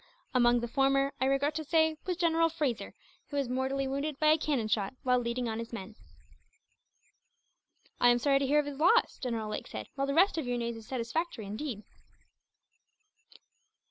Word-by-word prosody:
Among 240 -1 +4
the 240 - -3
former, 275 +2 +2
I - - +3
regret 275 +3 +1
to 315 +1 -3
say, 320 +1 +2
was 360 -2 -1
General 330 -1 +3
Fraser, 295 -8 -3 0.3
who 285 - -4
was 275 -2 0
mortally 265 +2 -1
wounded 280 +2 -3
by 305 - +4
a 310 - +5
cannon 275 -8 0
shot, 205 +1 -1
while 250 -1 +3
leading 240 0 -2
on 220 0 -3
his 230 0 -6
men." 225 -2 -7 2.1
"I 245 - +6
am 240 - +5
sorry 275 +2 +2
to 275 - 0
hear 290 +3 +3
of 295 - +3
his 285 -1 -6
loss," 360 +10 +3
General 230 -4 -3
Lake - - -5
said, - - -7
"while 275 0 -2
the 275 - -1
rest 360 0 +4
of 280 - -4
your 245 0 -1
news 235 -1 -3
is 225 -1 -11
satisfactory, 255 0 -3
indeed. 215 +1 -5
270 Hz, 185 wpm, -30 LUFS, 240-300 Hz, 2.1 s, I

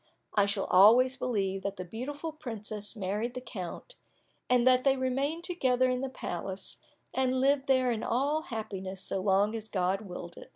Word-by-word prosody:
I 205 -1 +3
shall 200 -1 -1
always 235 +8 +6
believe 195 -7 -1
that 200 0 -3
the 185 - -5
beautiful 285 - -5
princess 220 -7 -5
married 210 +4 -2
the - - -2
count, 230 - -7 0.5
and 250 -1 +4
that 255 0 +5
they 270 -1 +3
remained 275 +6 -1
together 255 -8 +2
in 250 0 -1
the 270 - -2
palace, 190 -5 -5 0.4
and 260 0 +1
lived 275 +1 +2
there 260 -2 +3
in 225 -2 -2
all 280 +7 +1
happiness 195 -5 -5
so 195 - -2
long 200 +2 +3
as 220 -1 -5
God 190 +1 0
willed 180 -4 -8
it. - - -11
230 Hz, 175 wpm, -30 LUFS, 195-260 Hz, 0.5 s, always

